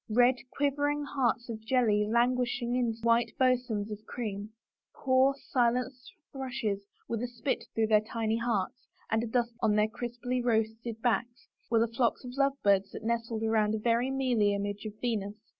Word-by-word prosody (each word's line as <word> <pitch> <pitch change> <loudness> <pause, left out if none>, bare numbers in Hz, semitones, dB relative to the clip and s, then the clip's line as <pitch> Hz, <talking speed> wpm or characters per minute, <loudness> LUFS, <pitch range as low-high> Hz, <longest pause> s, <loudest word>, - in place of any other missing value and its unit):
Red, 245 +3 +4 0.2
quivering 290 +1 +1
hearts 255 -4 0
of 220 -2 -6
jelly 220 -4 +2
languished 245 +1 +1
in 240 -1 0
white 235 0 +3
bosoms 245 -5 +1
of 210 0 -6
cream; 210 -3 -4 0.5
poor, 265 +1 +3 0.2
silenced 250 0 0 0.2
thrushes, 245 -7 -3 0.3
with 230 -1 -2
a 245 - -1
spit 240 0 -3
through 225 - +3
their 215 -1 +4
tiny 220 0 -1
hearts 230 -1 -2 0.2
and 220 0 +2
a - - -2
dusting 235 +1 0
of 225 - +3
sugar - - +3
on - - +1
their 210 0 +4
crisply 240 +2 -3
roasted 225 -1 -1
backs, 240 +1 -1 0.2
were 230 -1 +3
the 230 - +3
flocks 235 +2 0
of 250 0 -7
love 275 0 +3
birds 195 -1 +3
that - - -7
nestled 230 -1 -1
around 220 -1 +2
a - - -1
very 235 +3 +1
mealy 245 -7 +2
image 205 +1 -4
of 210 0 -10
Venus. 210 -4 -1
235 Hz, 175 wpm, -30 LUFS, 220-250 Hz, 0.5 s, Red